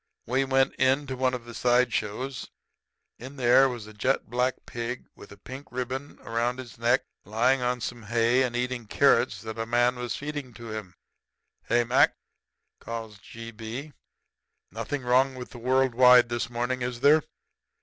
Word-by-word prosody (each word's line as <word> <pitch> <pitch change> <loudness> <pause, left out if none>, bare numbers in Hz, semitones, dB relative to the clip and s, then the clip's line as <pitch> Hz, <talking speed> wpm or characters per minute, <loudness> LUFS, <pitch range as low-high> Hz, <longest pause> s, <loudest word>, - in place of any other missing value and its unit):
We 130 +3 +1
went 135 0 +2
into 130 +1 +1
one 130 0 +1
of 120 -2 -8
the 120 - -10
side 125 -1 +2
shows. 115 +4 -3 0.7
In 130 +4 -9
there 130 +1 +5
was 120 -4 -6
a 110 - -12
jet 130 +6 0
black 125 +1 0
pig 120 0 -5
with - - -14
a 100 - -12
pink 130 +7 -10
ribbon 130 +3 -4
around 120 +2 -1
his 125 -3 -10
neck 120 +3 +3 0.2
lying 120 +6 +2
on 125 0 -1
some 120 +1 -5
hay 115 +3 +2
and 125 -2 0
eating 125 -2 -2
carrots - - +3
that 110 0 -6
a 115 - -2
man 120 +1 +2
was 120 -1 -3
feeding 145 -4 -6
to 115 -2 -8
him. 105 -4 -7 0.7
"'Hey, 120 +1 +2
Mac,' 120 +3 +4 0.6
calls 115 -2 -7
G. 115 +2 -10
B. 115 +7 -7 0.8
'Nothing 115 +6 -4
wrong 130 +2 +3
with 125 -1 -8
the 120 - -10
world 130 +1 +2
wide 125 0 +7
this 120 -1 -2
morning, 120 +2 -2
is 120 -1 -3
there?' 150 +3 +6
125 Hz, 170 wpm, -27 LUFS, 115-130 Hz, 0.8 s, wide